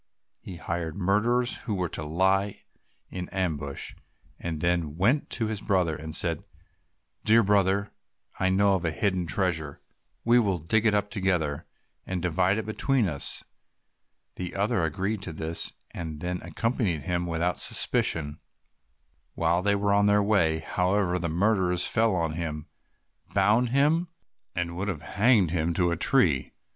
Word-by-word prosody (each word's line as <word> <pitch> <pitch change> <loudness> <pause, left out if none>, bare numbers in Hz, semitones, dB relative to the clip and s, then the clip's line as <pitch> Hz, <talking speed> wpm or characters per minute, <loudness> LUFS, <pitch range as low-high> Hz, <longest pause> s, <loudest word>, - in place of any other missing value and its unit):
He 95 - -8
hired 85 -1 -4
murderers, 115 +6 +1
who 105 - -1
were 90 -2 -1
to - - -4
lie 95 +5 0 0.5
in 90 -1 -5
ambush, 80 -7 -3 0.5
and 80 -3 -4
then 85 +2 +2
he - - -5
went 100 - +1
to 115 - -1
his 110 -2 -3
brother 90 -5 +1
and 80 +1 -6
said, 85 -2 -1 0.8
"Dear 115 +2 +5
brother, 100 0 +2 0.5
I 95 - +2
know 100 +1 +3
of 95 -2 0
a 85 - +1
hidden 90 +1 -1
treasure, 80 -5 -1 0.5
we 120 +1 +5
will 100 -6 +1
dig 105 +8 +1
it 105 - +3
up 105 0 -1
together, 85 -7 -1 0.4
and 95 -1 -3
divide 90 +3 +1
it 110 - -3
between 115 +1 +1
us." 75 -5 +2 0.9
The 90 -1 -5
other 100 -2 +1
agreed 95 +6 -2
to 90 -4 -6
this, 80 +1 0 0.2
and 80 -2 -6
accompanied 90 - -2
him 90 0 -2
without 85 +1 -1
suspicion. 75 -1 0 1.0
While 85 +1 +1
they 100 +1 +2
were 100 0 +1
on 100 0 +4
their 105 0 +4
way, 85 -7 +2
however, 90 +2 0
the 85 -1 -2
murderers 90 0 +2
fell 110 -3 +2
on 85 -3 0
him, 80 -2 -4 0.7
bound 105 +5 +3
him, 150 +7 +2 0.5
and 85 -1 -2
would 95 +3 -2
have 85 -6 -4
hanged 100 -2 +3
him 85 -1 0
to 90 -1 +2
a - - +1
tree. 85 - +2
90 Hz, 155 wpm, -27 LUFS, 85-105 Hz, 1.0 s, Dear